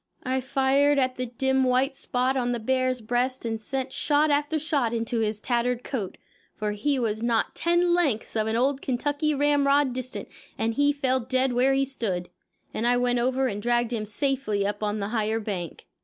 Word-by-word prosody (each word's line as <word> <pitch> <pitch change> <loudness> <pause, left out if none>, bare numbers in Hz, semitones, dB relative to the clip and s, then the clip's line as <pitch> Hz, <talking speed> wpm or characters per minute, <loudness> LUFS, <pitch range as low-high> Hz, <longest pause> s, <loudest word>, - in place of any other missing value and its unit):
I 260 +1 -1
fired 275 +2 +2
at 255 -1 +1
the 255 0 -2
dim 265 +2 +1
white 260 +2 +2
spot 255 0 -1
on 245 -2 0
the 240 - -2
bear's 255 +1 0
breast 245 +3 -1
and 225 -1 -3
sent 265 +2 -3
shot 295 0 +2
after 290 +2 +1
shot 285 -6 0
into 230 0 -1
his 215 -1 -1
tattered 240 +1 0
coat, 215 -9 -4 0.4
for 210 -1 -2
he 270 +8 0
was 220 -3 -1
not 235 -1 0
ten 345 +1 +2
lengths 285 -14 0
of 220 -1 +1
an 220 - 0
old 265 +3 +1
Kentucky 290 +4 0
ramrod 285 -1 +3
distant, 255 0 -5 0.3
and 225 +1 0
he 285 +3 +3
fell 265 -2 +1
dead 255 +1 0
where 255 +3 +3
he 275 0 +2
stood, 200 -10 -3 0.4
and 230 - -1
I 245 0 +3
went 245 0 +1
over 260 +2 +1
and 205 -5 -2
dragged 240 +1 +1
him 215 -2 -3
safely 215 -3 0
up 205 +2 -3
on 210 0 -1
the 200 - -2
higher 220 -1 0
bank. 190 -7 -5
255 Hz, 195 wpm, -26 LUFS, 225-275 Hz, 0.4 s, ramrod